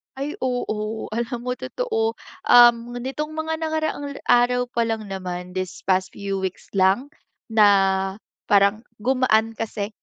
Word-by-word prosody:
Ay, 295 +7 -4
oo. 220 -3 -3
Alam 235 +2 -3
mo 250 +1 -3
totoo. 450 -2 -2 0.3
Um, 240 0 +6
nitong 300 +4 -4
mga 320 0 -2
nakaraang 315 -3 -2 0.2
araw 245 0 +3
pa 235 -1 0
lang 220 -3 -3
naman, 180 -1 -5
these 185 -1 -4
past 185 0 +1
few 195 -1 -3
weeks 190 -1 -5
lang, 195 +9 +3 0.4
na 215 -2 +5 0.8
parang 200 +3 +3 0.2
gumaan 225 -3 +2
kasi 210 -2 -3
235 Hz, 130 wpm, -23 LUFS, 205-265 Hz, 0.8 s, Um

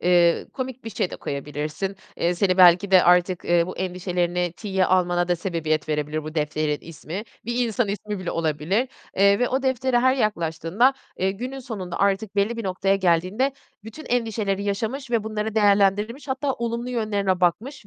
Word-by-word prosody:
eee, 175 -1 +3
komik 260 -2 -6
bir 225 - -5
şey 185 - -2
de - - -6
koyabilirsin. 150 +7 -4 0.2
Eee, 175 +1 +1
seni 185 0 +1
belki 180 +2 +6
de 185 -1 +7
artık, 180 0 +3
eee, 170 -1 +3
bu 185 - -7
endişelerini 180 -1 -1
tiye 190 -3 0
almana 175 -1 +2
da 175 - +2
sebebiyet 160 -4 -2
verebilir 150 0 -2
bu 155 +1 -7
defterin 150 -1 -1
ismi. 165 +4 -7 0.2
Bir 240 +1 0
insan 225 -1 0
ismi 205 0 -4
bile 185 - -4
olabilir. 165 - 0 0.3
Eee, 200 +1 +5
ve 245 - +1
o 265 +1 -1
deftere 260 -1 +1
her 260 +1 +4
yaklaştığında, 205 - +1 0.2
eee, 190 +1 +1
günün 250 +7 -5
sonunda 200 -8 -6
artık 200 +1 0
belli 215 +4 +1
bir 230 - -5
noktaya 195 +1 +1
geldiğinde 190 +9 +1 0.3
bütün 225 +8 -10
endişeleri 220 -5 -1
yaşamış 225 +6 -3
ve 225 -3 +1
bunları 215 0 -3
değerlendirmiş 205 +5 +2
hatta 270 +1 -1
olumlu 235 0 -3
yönlerine 205 -6 0
bakmış 215 - -1
195 Hz, 170 wpm, -24 LUFS, 175-230 Hz, 0.3 s, de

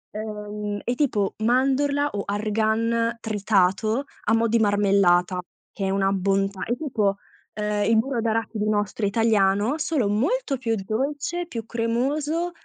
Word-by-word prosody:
ehm, 210 -1 -5
è 240 - 0
tipo 215 -9 0
mandorla 275 +4 +2
o 200 -1 -3
argan 220 +3 0
tritato 215 +2 +1 0.2
a 225 - +4
mo' 230 0 +2
di 230 +1 +2
marmellata, 195 -4 +3 0.3
che 195 - -3
è - - 0
una 195 0 +1
bontà, 195 0 0
è 240 - -1
tipo, 215 -10 0 0.4
ehm, 210 -1 -1
il 225 - +4
burro 235 +1 0
d'arachidi 220 -1 -1
nostro, 205 0 -1
italiano, 210 +3 +2
solo 300 -8 0
molto 275 - 0
più 230 -3 -1
dolce, 285 - -2
più 230 -8 -6
cremoso 280 +9 -1
220 Hz, 140 wpm, -24 LUFS, 205-250 Hz, 0.4 s, a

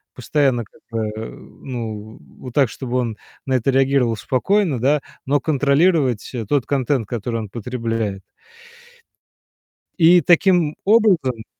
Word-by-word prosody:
постоянно 130 -1 0
как - - -24
бы, 115 -1 -1
э, 110 - -5
ну, 110 -4 -8 0.2
вот 125 -2 -9
так, 135 -5 +3
чтобы 125 0 -4
он 115 -4 -2 0.3
на 130 - -1
это 130 +2 +1
реагировал 135 -3 +2
спокойно, 165 - 0
да, 145 +5 +2 0.3
но 145 +2 +2
контролировать, 145 - +1
э, 115 -4 -4
тот 135 +1 0
контент, 135 -4 0
который 115 0 -3
он 105 - -7
потребляет. 115 -3 -3 1.8
И 175 +1 +6
таким 175 -3 +3
образом 185 - +3
130 Hz, 130 wpm, -20 LUFS, 115-145 Hz, 1.8 s, И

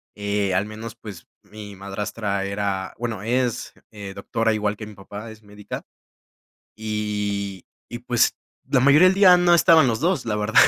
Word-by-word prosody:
eh, 100 -2 -1
al 95 +2 +1
menos, 110 +1 -8
pues, 100 -6 -11 0.2
mi 105 -1 -11
madrastra 100 +1 -3
era, 100 -1 -3
bueno, 115 -4 -4
es, 120 +1 -1 0.2
eh, 100 -2 -8
doctora 115 +3 -1
igual 105 -1 -1
que 105 0 -8
mi 105 - -12
papá, 105 +3 -9
es 110 0 -15
médica 105 0 -8 0.9
y 105 -3 -3 0.3
y, 120 - -4
pues, 120 -1 +1 0.3
la - - +4
mayoría 145 +8 +6
del 190 - +2
día 185 -3 +7
no 175 0 +3
estaban 160 -5 +6
los 110 -1 0
2, 175 +2 0
la 105 -2 -1
verdad. 105 +1 -3
105 Hz, 170 wpm, -23 LUFS, 100-120 Hz, 0.9 s, día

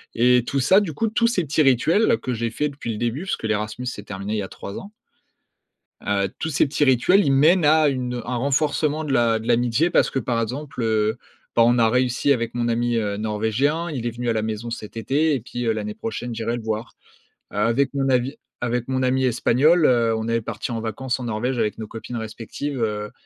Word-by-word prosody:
et 125 +1 +4
tout 140 - 0
ça 190 +10 +5
du 175 -6 -3
coup 225 +9 -1
tous 230 +2 +2
ces 230 -6 0
petits 155 +2 +1
rituels 165 - +3
que 125 - -3
j'ai 115 0 -2
fait 150 +6 -1
depuis 140 -4 -6
le - - -5
début 120 +8 -2
puisque 190 - -3
l'Erasmus 110 +2 -2
s'est 115 - -4
terminé 100 +1 -5
il - - -1
y - - -2
a - - -5
3 100 - -7
ans 200 - -11 1.1
heu, 100 -1 +1
tous 160 - -2
ces 150 - +2
petits 145 +1 0
rituels, 145 - +4
ils 140 - +2
mènent 155 +5 +4
à 155 0 +5
une 125 -3 -2
un 125 - -3
renforcement 145 +3 0
de 145 -3 -2
l'a 115 -3 +3
de 110 - -8
l'amitié 120 +7 +2
parce - - +3
que - - -4
par 120 -1 -1
exemple, 130 +4 -5
heu, 110 0 +1 0.4
bah, 115 - +6
on 120 +1 +4
a 115 -1 +4
réussi 125 +3 +1
avec 115 -2 -3
mon 120 -1 0
ami, 120 +1 0
heu, 105 -3 -1
Norvégien, 110 +10 0
il 125 -5 -3
est - - -2
venu 120 +1 -5
à - - +2
la 110 - 0
maison 110 +1 -4
cet 115 -1 -7
été 150 +7 +1
et - - -2
puis, 120 +1 -5
heu, 110 - +3
l'année 105 -1 -4
prochaine 115 +3 -5
j'irai 115 +1 -2
le 115 - -8
voir. 110 0 -4 0.6
Avec 115 +6 +1
mon 135 -1 0
avis 130 +2 +1 0.2
avec 120 0 -2
mon 130 0 0
ami 130 +1 +1
Espagnol, 145 +7 +3
heu, 115 -2 +3
on 110 0 -3
est 115 0 +1
partis 115 - -5
en 115 - -2
vacances 120 +3 -3
en 125 - -5
Norvège 120 +3 -2
avec 110 -2 -1
nos 110 - -5
copines 115 +3 -7
respectives, 115 +5 -5
heu, 105 -1 -2
120 Hz, 230 wpm, -23 LUFS, 115-140 Hz, 1.1 s, bah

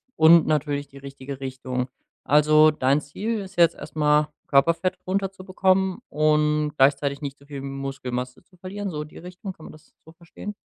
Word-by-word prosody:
und 160 0 +7
natürlich 145 -2 0
die 140 - -15
richtige 135 0 -8
Richtung. 130 -1 -4 0.4
Also 155 +1 +5
dein 140 0 +1
Ziel 210 +10 -3
ist 195 -1 -9
jetzt 170 -1 +5
erst - - -11
mal, 150 0 +3 0.2
Körperfett 170 +6 +2
runterzubekommen 190 0 0
und 150 0 +1
gleichzeitig 140 +1 +2
nicht 140 -1 -5
so 140 - -20
viel 140 -2 -7
Muskelmasse 135 -2 -5
zu 180 - -26
verlieren, 195 +2 -5
so 150 -2 -4
die 150 - -14
Richtung. 180 +3 -8
Kann 160 - -15
man - - -10
das 155 0 -19
so 160 - -14
verstehen? 175 +5 -9
150 Hz, 170 wpm, -24 LUFS, 140-180 Hz, 0.4 s, und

